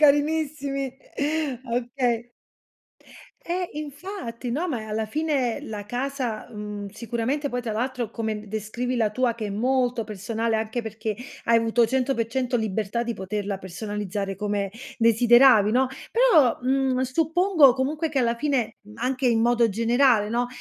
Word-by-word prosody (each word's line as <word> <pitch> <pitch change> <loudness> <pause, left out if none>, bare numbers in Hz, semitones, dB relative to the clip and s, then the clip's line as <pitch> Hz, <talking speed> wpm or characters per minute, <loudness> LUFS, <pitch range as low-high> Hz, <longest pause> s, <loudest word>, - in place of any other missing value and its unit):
carinissimi. 290 -2 +2 0.8
Okay. 240 -1 0 1.2
Eh, 355 +1 -2
infatti, 295 - -6
no, 305 +9 -1
ma 250 -7 -2
eh, 220 - -7
alla 215 0 -2
fine 280 -2 0
la 205 -2 -6
casa, 250 -1 -3
mhmm, 210 -1 -6
sicuramente 240 +7 -2
poi 245 -1 -3
tra 230 - -3
l'altro, 240 0 -2
come 220 -2 -3
d 210 - -13
descrivi 220 +4 -3
la 220 -3 +2
tua 245 +1 +1
che 220 -2 -4
è - - -4
molto 245 +2 +1
personale, 220 +2 -2
anche 225 +2 -2
perché 220 0 -4 0.3
hai 230 0 +4
avuto 230 +1 +3
100% 255 0 0
libertà 220 +1 -1
di 235 - -2
poterla 200 0 -3
personalizzare 195 +1 -4
come 205 0 -2 0.3
desideravi, 230 -1 +6
no, 255 +3 +3 0.2
però, 380 - +5
mhmm, 260 0 +1
suppongo 320 +2 +4
comunque 290 +5 -1
che 285 -3 -1
alla 235 -2 +2
fine, 270 -2 -1
mhmm, 210 +1 -14
anche 255 +1 0
in 225 -2 +3
modo 235 0 +3
generale, 230 +1 +3
no, 240 +2 0
240 Hz, 145 wpm, -25 LUFS, 220-265 Hz, 1.2 s, desideravi